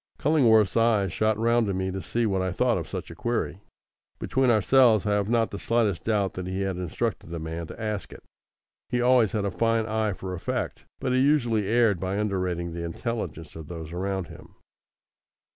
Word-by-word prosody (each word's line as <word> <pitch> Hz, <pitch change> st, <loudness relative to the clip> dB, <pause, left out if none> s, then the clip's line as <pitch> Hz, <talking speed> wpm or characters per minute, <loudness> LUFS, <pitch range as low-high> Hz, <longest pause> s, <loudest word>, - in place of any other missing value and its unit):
Cullingworth's 115 Hz, -, +4 dB
eyes 110 Hz, -6 st, +2 dB
shot 110 Hz, +1 st, +1 dB
round 115 Hz, 0 st, +2 dB
to 100 Hz, -, -1 dB
me 95 Hz, 0 st, -1 dB
to 95 Hz, +1 st, -4 dB
see 120 Hz, +5 st, -1 dB
what 95 Hz, -3 st, 0 dB
I 95 Hz, 0 st, -1 dB
thought 120 Hz, +5 st, +2 dB
of 85 Hz, -, -6 dB
such -, -, -6 dB
a -, -, -9 dB
query. -, -, -2 dB, 0.6 s
Between 130 Hz, -1 st, +1 dB
ourselves 115 Hz, -1 st, +4 dB
I 105 Hz, -, +1 dB
have 105 Hz, 0 st, +1 dB
not 115 Hz, -1 st, +2 dB
the 100 Hz, -, -5 dB
slightest 115 Hz, -6 st, 0 dB
doubt 105 Hz, -4 st, +1 dB
that 90 Hz, -1 st, -5 dB
he 95 Hz, +1 st, -3 dB
had 95 Hz, -1 st, -1 dB
instructed 90 Hz, -3 st, -3 dB
the 85 Hz, -, -5 dB
man 80 Hz, +1 st, -5 dB
to -, -, -10 dB
ask 105 Hz, -2 st, -3 dB
it. -, -, -12 dB, 0.7 s
He 125 Hz, -, 0 dB
always 125 Hz, -3 st, +4 dB
had 105 Hz, -2 st, 0 dB
a 100 Hz, -, -1 dB
fine 115 Hz, +3 st, +1 dB
eye 110 Hz, -1 st, 0 dB
for 95 Hz, 0 st, -6 dB
effect, 90 Hz, -, -4 dB
but 130 Hz, -1 st, -1 dB
he 130 Hz, -, +3 dB
usually 120 Hz, -7 st, +2 dB
erred 110 Hz, -4 st, +3 dB
by 95 Hz, +2 st, -2 dB
underrating 90 Hz, -4 st, -1 dB
the 85 Hz, 0 st, -5 dB
intelligence 85 Hz, -2 st, -5 dB
of 80 Hz, -2 st, -8 dB
those 80 Hz, -1 st, -7 dB
around 95 Hz, +1 st, -2 dB
him. -, -, -14 dB
105 Hz, 200 wpm, -26 LUFS, 95-115 Hz, 0.7 s, Cullingworth's